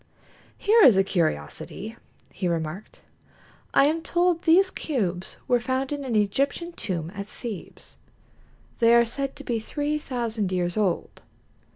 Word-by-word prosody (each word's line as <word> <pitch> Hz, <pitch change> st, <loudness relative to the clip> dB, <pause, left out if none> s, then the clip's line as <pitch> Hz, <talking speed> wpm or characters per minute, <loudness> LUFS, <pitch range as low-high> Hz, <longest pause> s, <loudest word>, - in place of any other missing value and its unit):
"Here 440 Hz, +3 st, +4 dB
is 235 Hz, -, +8 dB
a 195 Hz, -, +5 dB
curiosity," 175 Hz, -, -2 dB, 0.4 s
he 185 Hz, -, -3 dB
remarked. 170 Hz, +3 st, -4 dB, 0.7 s
"I 275 Hz, -, +5 dB
am 315 Hz, +3 st, +1 dB
told 345 Hz, 0 st, +1 dB
these 370 Hz, +3 st, +4 dB
cubes 190 Hz, -, -3 dB
were 245 Hz, -2 st, +3 dB
found 260 Hz, +3 st, -2 dB
in 290 Hz, -1 st, -3 dB
an 250 Hz, -4 st, -2 dB
Egyptian 275 Hz, -, 0 dB
tomb 175 Hz, -, -4 dB
at 200 Hz, 0 st, -6 dB
Thebes. 220 Hz, -2 st, -9 dB, 0.8 s
They 230 Hz, 0 st, +6 dB
are 235 Hz, 0 st, +6 dB
said 275 Hz, +4 st, -3 dB
to 285 Hz, -, -10 dB
be 235 Hz, -4 st, -1 dB
three 295 Hz, +6 st, -2 dB
thousand 230 Hz, -8 st, -2 dB
years 175 Hz, -1 st, -1 dB
old." 200 Hz, -5 st, -1 dB
235 Hz, 145 wpm, -25 LUFS, 195-285 Hz, 0.8 s, is